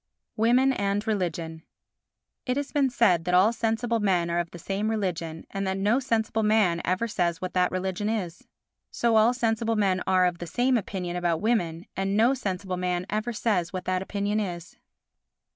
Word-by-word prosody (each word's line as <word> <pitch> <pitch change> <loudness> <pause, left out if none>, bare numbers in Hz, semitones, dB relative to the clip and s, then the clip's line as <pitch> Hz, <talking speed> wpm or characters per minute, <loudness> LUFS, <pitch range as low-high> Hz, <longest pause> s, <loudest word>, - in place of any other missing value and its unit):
Women 245 +4 +3
and 200 -1 -1
Religion 170 -6 -2 0.9
It 250 +1 0
has 285 0 -3
been 280 -3 +2
said 205 -9 +3
that 180 0 +2
all 200 +6 +5
sensible 230 +1 0
men 180 -5 +1
are 170 - +1
of 170 -1 -2
the 175 - -10
same 195 +5 -2
religion 170 -7 -3
and 195 0 -3
that 190 0 -1
no 210 +6 +2
sensible 225 -4 0
man 210 -6 +2
ever 185 +6 0
says 175 -6 -1
what 185 - -5
that 180 -1 +2
religion 190 +3 -2
is. 185 -6 -4 0.4
So 235 -1 +1
all 220 +2 +5
sensible 225 -1 0
men 190 -3 +1
are 185 -1 +4
of 175 -1 -1
the 175 - -6
same 250 +8 +1
opinion 185 -5 -3
about 170 -2 0
women 175 -6 0
and 195 +1 -1
no 235 +4 +4
sensible 190 -6 -3
man 180 0 -1
ever 215 +3 -1
says 205 -6 0
what 185 -1 -4
that 185 0 0
opinion 205 +2 -1
is. 175 -4 -5
195 Hz, 185 wpm, -26 LUFS, 180-225 Hz, 0.9 s, all